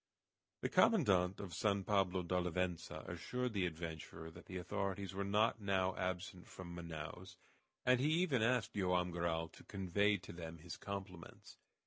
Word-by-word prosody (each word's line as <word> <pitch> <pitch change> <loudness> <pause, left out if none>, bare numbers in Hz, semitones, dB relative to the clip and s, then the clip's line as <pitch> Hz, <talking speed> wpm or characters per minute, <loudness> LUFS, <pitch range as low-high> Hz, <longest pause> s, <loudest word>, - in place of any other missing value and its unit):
The - - 0
commandant 95 - +4
of 95 -4 -6
San 100 +2 +2
Pablo 95 -2 +2
d'Olivença 90 -1 -1
assured 125 +9 -2
the 95 -3 +2
adventurer 80 -1 -6
that - - -13
the 95 - -4
authorities 95 +1 -2
were 100 +1 -1
not 105 +3 +2
now 95 -2 +2
absent 90 0 -3
from 85 -2 -8
Manaos, 85 +2 -6 0.5
and 125 0 +5
he 140 +4 +3
even 165 -8 +3
asked 125 0 +2
Joam 90 -2 +2
Garral 85 -1 0
to - - -15
convey 100 +1 +2
to 90 -2 -10
them 85 -1 -6
his 85 +1 -7
compliments. 95 -4 -7
95 Hz, 150 wpm, -38 LUFS, 85-100 Hz, 0.5 s, and